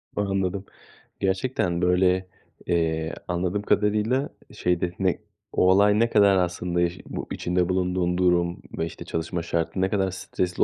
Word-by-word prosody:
Anladım. 95 -1 -1 0.5
Gerçekten, 95 -2 0
böyle, 90 +1 +3 0.4
eee, 80 -2 0
anladığım 90 +3 -1
kadarıyla, 105 +6 +1 0.2
şeyde, 90 0 0
ne 95 -2 +1 0.3
o 90 - +4
olay 105 +2 +5
ne 115 - +3
kadar 100 -3 +5
aslında 90 0 0
eş 85 +1 0
bu - - -6
içinde 90 0 0
bulunduğun 90 -1 0
durum 90 -1 +2 0.2
ve, 80 - 0
işte, 85 - -8
çalışma 80 +2 -3
şartı 85 +2 -1
ne 95 - +2
kadar 95 -2 0
stresli 90 -1 -1
90 Hz, 140 wpm, -25 LUFS, 85-95 Hz, 0.5 s, olay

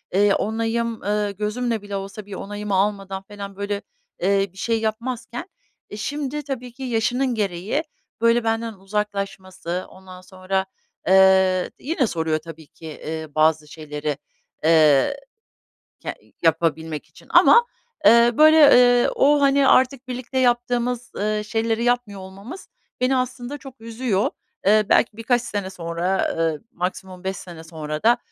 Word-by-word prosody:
ııı, 200 +1 +4
onayım, 225 +1 -1
ııı, 205 0 -1
gözümle 215 +3 -2
bile 205 0 -6
olsa 195 +1 -6
bir 205 - -10
onayımı 205 +1 -4
almadan 195 -1 -1
felan, 200 -1 -9
böyle, 200 0 -3 0.4
ııı, 195 +1 +3
bir - - -20
şey 225 +3 0
yapmazken, 235 +4 -4 0.4
e, 210 - -8
şimdi 290 +4 -3
tabii 255 -3 -5
ki 265 - -9
yaşının 245 +1 0
gereği, 205 - -1 0.4
böyle, 230 0 +3
benden 225 0 -1
uzaklaşması. 195 -3 -4
Ondan 185 -1 -13
sonra, 190 +1 -3 0.4
ııı, 190 -1 +5
yine 285 -3 0
soruyor 160 -4 -1
tabii 160 -1 -12
ki, 160 0 -11
ııı, 160 -1 -5
bazı 155 0 +3
şeyleri, 150 -1 -5 0.5
ııı, 155 - +5 0.9
ke - - -5 0.3
yapabilmek 160 -1 0
için - - -19
ama, 475 0 +6 0.4
eee, 235 +1 +7
böyle, 310 -1 +8 0.3
ııı, - - +1
o, 290 +1 +4
hani, 275 -1 +4
artık 260 0 +3
birlikte 255 +1 -4
yaptığımız, 245 0 0
ııı, 210 +1 -1
şeyleri 225 +1 -1
yapmıyor 240 -5 0
olmamız 195 - -10 0.3
beni 255 +1 +2
aslında 255 +2 -3
çok 270 -3 -13
üzüyor. 225 -3 -1 0.4
Eee, 210 +1 +5
belki 220 - +3
birkaç 235 +2 +1
sene 205 -5 -4
sonra, 175 +1 -2
eee, 165 -2 0
maksimum 185 -1 -5
5 190 0 -2
sene 170 -3 -10
sonra 155 -2 -6
da, 240 +2 +4
205 Hz, 140 wpm, -22 LUFS, 185-240 Hz, 0.9 s, böyle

